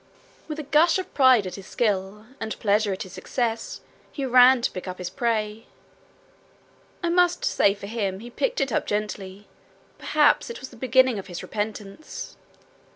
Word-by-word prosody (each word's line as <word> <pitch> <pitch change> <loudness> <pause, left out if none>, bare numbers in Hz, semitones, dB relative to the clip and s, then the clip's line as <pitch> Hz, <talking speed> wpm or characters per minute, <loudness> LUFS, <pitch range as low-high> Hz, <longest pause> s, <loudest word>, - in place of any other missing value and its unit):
With 305 -1 -5
a 310 - -4
gush 310 +5 +4
of 375 - -6
pride 260 -6 +5
at 185 - -5
his 195 0 -9
skill, 210 -1 -1
and 220 - -4
pleasure 205 0 +2
at 190 +3 -3
his 185 -1 -12
success, 230 -1 -3 0.3
he 275 - -4
ran 250 0 +6
to - - +1
pick 185 - -7
up 185 0 -5
his 180 -1 -5
prey. 215 0 -2 1.4
I 340 - +1
must 350 0 +2
say 200 0 +3
for 200 - -9
him 200 -3 -3
he 240 +3 -10
picked - - -1
it 270 - 0
up - - -1
gently 205 -1 -4 0.5
perhaps 300 +7 +3
it 470 - -7
was 260 - -8
the - - -15
beginning 255 -1 +3
of 195 - -9
his 175 -2 -7
repentance. 210 +5 -6
225 Hz, 175 wpm, -25 LUFS, 200-260 Hz, 1.4 s, ran